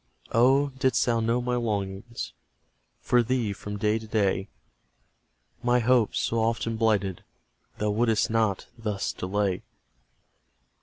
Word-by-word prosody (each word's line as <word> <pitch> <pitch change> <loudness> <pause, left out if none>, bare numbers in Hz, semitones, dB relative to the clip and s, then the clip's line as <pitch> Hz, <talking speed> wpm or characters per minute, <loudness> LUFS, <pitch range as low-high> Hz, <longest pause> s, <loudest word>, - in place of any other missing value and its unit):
Oh, 135 +5 +4
didst 130 -2 +2
thou 115 -2 +2
know 115 +2 +1
my 125 0 0
longings 105 -1 -3 0.7
For 125 -1 +3
thee, 120 -3 0
from 105 +1 -6
day 105 +2 +1
to 110 - -10
day, 100 -3 0 1.1
My 125 0 +3
hopes, 120 -1 +3
so 115 +1 0
often 115 0 0
blighted, 105 -5 +1 0.5
Thou 105 0 0
wouldst 110 0 +2
not 110 -4 +1
thus 105 -3 -2
delay! 95 0 -1
110 Hz, 120 wpm, -27 LUFS, 105-120 Hz, 1.1 s, Oh